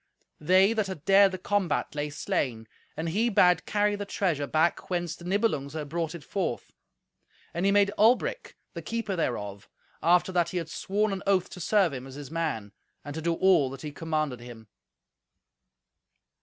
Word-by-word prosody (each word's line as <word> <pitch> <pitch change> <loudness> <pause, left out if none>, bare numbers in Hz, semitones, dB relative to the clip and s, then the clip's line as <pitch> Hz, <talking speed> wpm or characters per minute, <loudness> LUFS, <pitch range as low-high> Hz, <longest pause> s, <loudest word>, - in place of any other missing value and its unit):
They 185 +7 +4
that 215 -3 0
had 185 -6 -7
dared 195 0 +6
the 185 - -4
combat 190 -3 -1
lay 150 0 -2
slain; 120 -5 -2 0.3
and 165 +1 -2
he 220 +8 +1
bade 180 -4 +4
carry 205 0 +1
the 205 - -4
treasure 170 -8 -1
back 160 +3 +1
whence 175 -3 -2
the 170 - -13
Nibelungs 180 -8 0
had 150 -2 -5
brought 165 +1 -2
it 165 - -9
forth; 175 -10 -3 0.8
and 175 +3 0
he - - +4
made 200 0 +4
Albric 245 - +2 0.2
the - - -6
keeper 225 -4 -3
thereof, 105 - -3 0.3
after 175 +2 +3
that 175 -2 +1
he 180 - -4
had 165 -2 -3
sworn 200 +6 -1
an 195 - -4
oath 190 -2 +2
to - - -9
serve 185 -2 +2
him 130 0 -6
as 135 - -11
his 145 0 -9
man, 155 -11 -2 0.3
and 145 - -6
to 160 - -5
do 170 +1 0
all 175 -7 +4
that 135 0 -9
he 150 - -5
commanded 155 -4 -2
him." 120 -3 -12
170 Hz, 185 wpm, -27 LUFS, 145-195 Hz, 0.8 s, dared